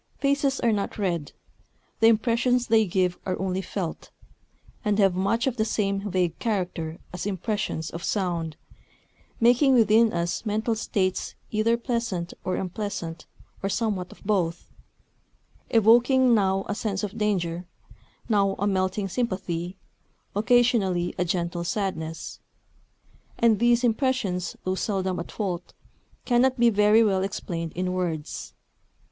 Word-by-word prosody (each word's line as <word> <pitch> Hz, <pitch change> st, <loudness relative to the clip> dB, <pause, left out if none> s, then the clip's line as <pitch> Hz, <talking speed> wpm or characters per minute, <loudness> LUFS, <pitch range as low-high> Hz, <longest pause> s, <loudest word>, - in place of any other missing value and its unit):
Faces 280 Hz, -1 st, +1 dB
are 235 Hz, -, +3 dB
not 205 Hz, 0 st, -2 dB
read. 175 Hz, -7 st, -1 dB, 0.7 s
The 225 Hz, -, +6 dB
impressions 235 Hz, +2 st, +3 dB
they 220 Hz, -2 st, +3 dB
give 180 Hz, 0 st, 0 dB
are 185 Hz, -, -2 dB
only 190 Hz, 0 st, -1 dB
felt, 185 Hz, -4 st, -5 dB, 0.7 s
and 210 Hz, -1 st, +1 dB
have 195 Hz, -3 st, +4 dB
much 200 Hz, +6 st, +1 dB
of 260 Hz, -2 st, -1 dB
the 220 Hz, -, +2 dB
same 200 Hz, -2 st, -1 dB
vague 180 Hz, -3 st, 0 dB
character 175 Hz, -7 st, -2 dB, 0.2 s
as 180 Hz, +2 st, -4 dB
impressions 190 Hz, -4 st, -2 dB
of 170 Hz, +2 st, -7 dB
sound, 170 Hz, -6 st, -1 dB, 0.8 s
making 250 Hz, +3 st, +5 dB
within 225 Hz, 0 st, +5 dB
us 170 Hz, 0 st, -2 dB
mental 220 Hz, +1 st, 0 dB
states 190 Hz, -4 st, -1 dB, 0.2 s
either 225 Hz, +2 st, +2 dB
pleasant 230 Hz, -8 st, -2 dB
or 185 Hz, -, -1 dB
unpleasant 180 Hz, -3 st, -4 dB, 0.3 s
or 195 Hz, -, -1 dB
somewhat 195 Hz, -3 st, -1 dB
of -, -, -16 dB
both, 180 Hz, -5 st, -1 dB, 1.0 s
evoking 240 Hz, +3 st, +5 dB
now 195 Hz, -2 st, +2 dB
a -, -, -1 dB
sense 205 Hz, -1 st, -2 dB
of 210 Hz, +1 st, -4 dB
danger, 180 Hz, -4 st, -1 dB, 0.6 s
now 200 Hz, -3 st, +2 dB
a 200 Hz, -, -1 dB
melting 195 Hz, 0 st, 0 dB
sympathy, 185 Hz, -5 st, -3 dB, 0.6 s
occasionally 205 Hz, -5 st, +2 dB
a -, -, +3 dB
gentle 170 Hz, 0 st, -2 dB
sadness. 170 Hz, -4 st, -3 dB, 1.0 s
And 225 Hz, -3 st, +4 dB
these 240 Hz, +1 st, +3 dB
impressions, 225 Hz, -7 st, 0 dB
though 185 Hz, -, 0 dB
seldom 190 Hz, -2 st, -1 dB
at 170 Hz, -, -6 dB
fault, 180 Hz, -4 st, -4 dB, 0.5 s
cannot 255 Hz, +1 st, +3 dB
be 235 Hz, -1 st, +5 dB
very 210 Hz, +2 st, +5 dB
well 195 Hz, -3 st, +2 dB
explained 170 Hz, -4 st, -4 dB
in 180 Hz, +1 st, -2 dB
words. 170 Hz, -5 st, -4 dB
200 Hz, 130 wpm, -26 LUFS, 180-225 Hz, 1.0 s, The